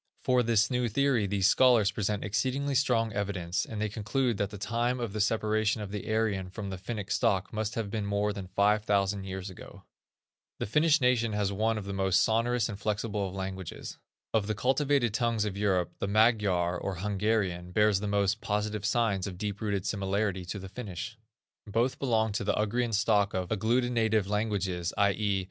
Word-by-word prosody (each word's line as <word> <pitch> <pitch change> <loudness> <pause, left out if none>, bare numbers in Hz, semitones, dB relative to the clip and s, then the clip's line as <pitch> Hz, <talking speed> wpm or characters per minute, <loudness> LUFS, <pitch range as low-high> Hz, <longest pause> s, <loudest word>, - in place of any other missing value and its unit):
For 125 -1 +3
this 110 -2 +2
new 125 -1 +1
theory 125 -3 +2
these 100 -1 0
scholars 115 -3 +5
present 105 0 -2
exceedingly 135 +7 -1
strong 120 -5 +2
evidence, 95 -4 -2
and 110 - -5
they 110 - 0
conclude 110 +3 -1
that 100 0 -1
the 105 - -8
time 120 +4 -1
of 115 -4 -3
the 110 - -1
separation 110 0 +1
of 105 -2 -6
the 105 +1 -4
Aryan 105 -4 0
from 100 0 -6
the 95 - -6
Finnic 105 0 -5
stock 100 -1 +1
must 110 0 -2
have 110 -3 -3
been 105 -2 -2
more 100 +1 0
than 100 -2 -7
five 105 +3 +2
thousand 100 -1 0
years 95 0 -5
ago. 90 - -12 0.7
The - - -2
Finnish 150 +7 +3
nation 120 -3 +2
has 100 -1 0
one 110 +2 +1
of 105 - -5
the 100 - -4
most 95 -1 +2
sonorous 115 +1 +1
and 105 -3 -7
flexible 105 -1 -1
of 95 - -9
languages. 95 -2 -6 0.3
Of 110 -2 +1
the 110 - -1
cultivated 130 0 +1
tongues 115 -2 +1
of 100 -2 -3
Europe, 95 -4 0
the - - -1
Magyar, 100 -5 +2
or 95 - -3
Hungarian, 95 -2 -1
bears 105 0 +3
the 105 - -3
most 100 +1 +1
positive 105 0 -2
signs 105 -4 +1
of 95 - -6
a - - -14
deep 100 0 -4
rooted 100 -3 -1
similarity 100 -1 -1
to 95 - -5
the 95 -1 -8
Finnish. 105 -1 -6 0.5
Both 115 +5 0
belong 110 -5 +1
to 100 - -2
the 100 - +1
Ugrian 115 +2 0
stock 100 -2 +2
of 90 -1 -2
agglutinative 110 -1 +1
languages, 100 -4 -1
i.e. 100 0 +2
105 Hz, 190 wpm, -29 LUFS, 100-115 Hz, 0.7 s, scholars